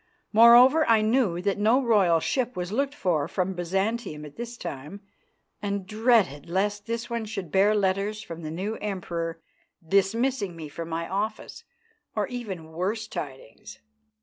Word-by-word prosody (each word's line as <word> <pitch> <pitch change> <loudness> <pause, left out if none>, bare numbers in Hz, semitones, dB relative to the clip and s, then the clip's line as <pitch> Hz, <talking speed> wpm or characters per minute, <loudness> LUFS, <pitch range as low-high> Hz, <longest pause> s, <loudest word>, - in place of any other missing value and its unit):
Moreover, 240 +7 +8
I 225 -1 +5
knew 215 -7 +1
that 200 0 0
no 220 +5 +4
royal 205 -10 +3
ship 250 - -1
was 180 +1 -3
looked 275 +5 -1
for 165 - 0
from 185 0 -1
Byzantium 190 -2 -2
at 145 - -12
this 235 0 -7
time, 150 - -7 0.6
and 200 -2 -2
dreaded 215 - +2
lest 205 +3 -1
this 230 +1 -3
one 235 -2 -3
should 195 -7 -6
bear 205 +3 +4
letters 200 +2 0
from 165 0 -8
the 155 - -5
new 195 +7 -3
Emperor 170 -5 -4 0.5
dismissing 200 +2 +1
me 160 -2 -8
from 165 +3 -7
my 165 0 -3
office, 210 +3 -4 0.5
or - - +1
even 195 -10 -6
worse 200 +6 -2
tidings. 135 - -8
200 Hz, 150 wpm, -26 LUFS, 170-225 Hz, 0.6 s, Moreover